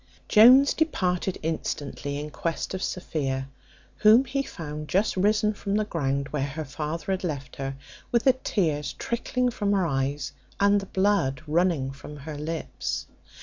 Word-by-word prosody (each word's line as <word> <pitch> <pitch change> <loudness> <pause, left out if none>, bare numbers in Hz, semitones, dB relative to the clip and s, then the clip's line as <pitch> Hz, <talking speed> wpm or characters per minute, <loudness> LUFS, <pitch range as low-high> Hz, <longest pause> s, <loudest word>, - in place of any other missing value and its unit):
Jones 255 +6 +8
departed 185 - 0
instantly 145 -2 -3
in 150 +1 -6
quest 165 +3 -3
of 190 - -3
Sophia, 135 -9 -2 0.5
whom 220 +5 +6
he 275 +2 -1
found 150 - -6
just 195 +6 +1
risen 210 +2 +2
from 200 -1 -3
the 215 0 +1
ground, 140 -7 -1
where 140 -2 -1
her 155 +2 -5
father 150 +4 -4
had 190 0 -1
left 140 -6 -4
her, 135 0 -3 0.4
with 235 -1 +3
the 265 - +6
tears 160 - -1
trickling 245 +1 -1
from 205 -3 0
her 190 -3 +2
eyes, 135 -2 -1 0.3
and 200 0 +4
the 195 - -8
blood 190 -10 +1
running 160 -4 +1
from 145 +2 -10
her 150 +2 -7
lips. 160 +3 -4
165 Hz, 155 wpm, -26 LUFS, 145-205 Hz, 0.5 s, Jones